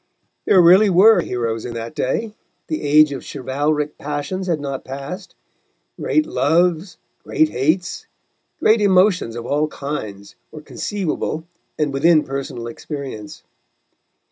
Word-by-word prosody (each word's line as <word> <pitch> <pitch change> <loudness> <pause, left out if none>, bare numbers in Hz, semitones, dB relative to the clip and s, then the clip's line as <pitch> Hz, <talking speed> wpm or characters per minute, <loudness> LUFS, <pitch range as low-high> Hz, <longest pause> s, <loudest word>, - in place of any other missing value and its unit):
There 190 - +5
really 185 +5 +6
were 190 +2 +6
heroes 115 -5 -3
in 120 -1 -6
that 115 +4 -6
day, 180 - -2 0.3
the 155 - -3
age 150 +1 +5
of 135 - -6
chivalric 145 +3 -2
passions 150 +6 -4
had 165 -3 0
not 140 -2 -5
passed, 140 +9 -8 0.6
great 310 - +1
loves, 175 - +1 0.3
great 155 - +2
hates, 155 +7 -1 0.5
great 220 0 +4
emotions 185 - +3
of 120 0 -6
all 150 +4 0
kinds, 110 -10 -6 0.2
were 155 - -9
conceivable 165 -2 -3 0.3
and 150 -2 -1
within 155 +3 +4
personal 135 -3 -5
experience. 120 -3 -7
150 Hz, 125 wpm, -20 LUFS, 135-180 Hz, 0.6 s, really